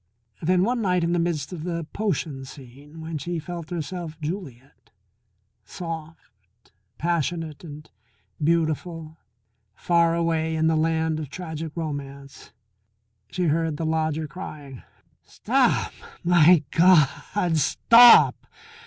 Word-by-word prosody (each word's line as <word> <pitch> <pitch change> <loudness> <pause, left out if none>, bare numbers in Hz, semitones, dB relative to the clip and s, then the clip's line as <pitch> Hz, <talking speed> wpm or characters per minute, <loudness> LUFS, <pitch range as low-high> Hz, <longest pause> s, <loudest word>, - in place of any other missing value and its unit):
Then 180 +2 +2
one 240 +3 0
night 180 -4 +1
in 170 +1 0
the 175 - +1
midst 165 -2 -2
of 160 -3 -7
the 170 -2 -4
potion 170 -10 -3
scene 140 +4 -13
when 160 -1 -5
she 170 +5 -4
felt 165 0 -7
herself 170 -1 -6
Juliet, 150 - -8 0.7
soft, 155 - -10 0.3
passionate, 165 -1 -2
and 150 -2 -10 0.6
beautiful, 160 0 -1 0.6
far 170 -1 +2
away 165 -1 -1
in 160 0 0
the 160 0 +2
land 160 0 0
of 150 -4 -6
tragic 160 -2 -6
romance, 140 -6 -7 0.8
she 180 - -3
heard 160 -1 0
the 165 - -3
lodger 160 -1 -1
crying: 140 -4 -9 0.4
"Stop - - 0 0.3
my 175 -2 +5
God, 165 +1 +3
stop! 235 - +6
160 Hz, 115 wpm, -24 LUFS, 150-175 Hz, 0.8 s, stop